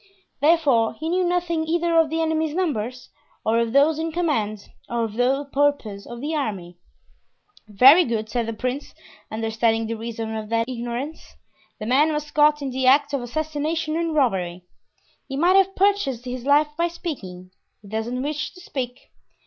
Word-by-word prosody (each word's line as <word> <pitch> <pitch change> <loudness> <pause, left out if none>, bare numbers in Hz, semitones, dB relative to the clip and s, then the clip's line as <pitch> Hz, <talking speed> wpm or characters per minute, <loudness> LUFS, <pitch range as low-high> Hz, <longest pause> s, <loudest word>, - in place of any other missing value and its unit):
Therefore, 285 -7 +3
he 320 +1 -4
knew 365 +2 +1
nothing 345 -2 0
either 340 +1 +1
of 320 -2 +3
the 325 +1 0
enemy's 315 -1 0
numbers, 255 - -2 0.4
or 225 +1 +2
of 230 -1 0
those 290 +4 +4
in 325 0 -2
command, 230 - -1 0.2
or 235 -1 -1
of 220 -2 -3
the 260 +5 +1
purpose 275 -9 0
of 240 0 -8
the 300 +3 -3
army. 190 - -4 0.9
"Very 265 - +7
good," 225 -6 -2
said 235 0 -2
the 230 - -3
prince, 250 +5 -4 0.3
understanding 225 +1 0
the 225 - -3
reason 225 0 -5
of 215 -1 -5
that 230 0 +1
ignorance; 250 +5 -5 0.4
"the 215 - -5
man 280 +7 +3
was 300 0 -4
caught 295 -1 +3
in 270 - -3
the 260 0 0
act 285 +2 +4
of 280 - 0
assassination 310 +4 -2
and 330 -1 -1
robbery; 185 - 0 0.6
he 270 - -5
might 350 +5 +4
have 390 0 +4
purchased 370 - +1
his 250 0 -5
life 295 +2 +4
by 340 +1 +1
speaking; 190 - -7 0.3
he - - -13
doesn't 225 +5 -3
wish 300 +1 -3
to - - -13
speak. 255 -6 -6
270 Hz, 175 wpm, -23 LUFS, 230-315 Hz, 0.9 s, Very